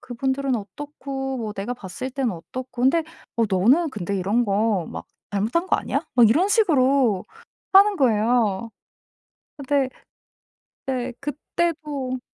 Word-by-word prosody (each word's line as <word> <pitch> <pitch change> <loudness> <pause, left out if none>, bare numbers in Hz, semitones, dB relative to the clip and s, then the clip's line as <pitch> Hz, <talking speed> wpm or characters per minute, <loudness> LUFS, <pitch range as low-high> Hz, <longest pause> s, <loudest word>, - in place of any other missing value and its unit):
그분들은 265 +1 -1
어떻고 270 +4 -5
뭐 220 -3 -4
내가 205 +4 -4
봤을 200 +5 -6
때는 260 -3 -1
어떻고 250 +8 -7
근데 315 +6 +3 0.3
어 230 - +4
너는 245 - +3
근데 200 -4 -3
이런 205 +6 +1
거 200 -3 +1
막 - - -7 0.2
잘못한 220 - 0
거 - - +4
아니야?" - - -2
막 240 -3 +7
이런 325 - +3
식으로 275 - +3 0.5
하는 400 +1 +7
거예요. 230 - +2 0.9
어 280 - -7
네. 280 -2 +3 1.0
네 255 -2 -2
그때도 295 -2 -3
255 Hz, 255 characters per minute, -23 LUFS, 215-280 Hz, 1.0 s, 막